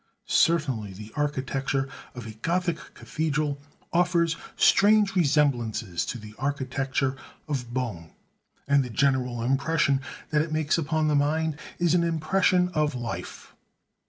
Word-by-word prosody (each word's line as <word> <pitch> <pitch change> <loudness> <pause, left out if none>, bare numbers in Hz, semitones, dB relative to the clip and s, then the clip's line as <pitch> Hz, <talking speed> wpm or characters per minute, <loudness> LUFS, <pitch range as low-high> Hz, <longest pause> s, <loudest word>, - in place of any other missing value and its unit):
Certainly 135 - +2
the 105 +3 -10
architecture 135 -2 -1 0.3
of 120 -2 -7
a 110 - -6
Gothic 165 - -2
cathedral 150 -2 -2 0.3
offers 170 -1 +2 0.2
strange 205 0 +5
resemblances 135 - +1
to 125 - -3
the 105 -1 -11
architecture 135 -1 -1 0.3
of 130 -5 -3
bone; 115 -11 -3 0.6
and 140 -1 +4
the 125 - -6
general 125 -1 +1
impression 140 +2 +2 0.3
that 150 -1 +3
it 155 +1 -3
makes 155 +1 +1
upon 155 0 0
the 150 - +2
mind 155 +2 +1 0.2
is 175 -1 +2
an 175 -1 +3
impression 180 +2 +2
of 150 -5 0
life. 120 -1 -6
145 Hz, 130 wpm, -26 LUFS, 130-160 Hz, 0.6 s, strange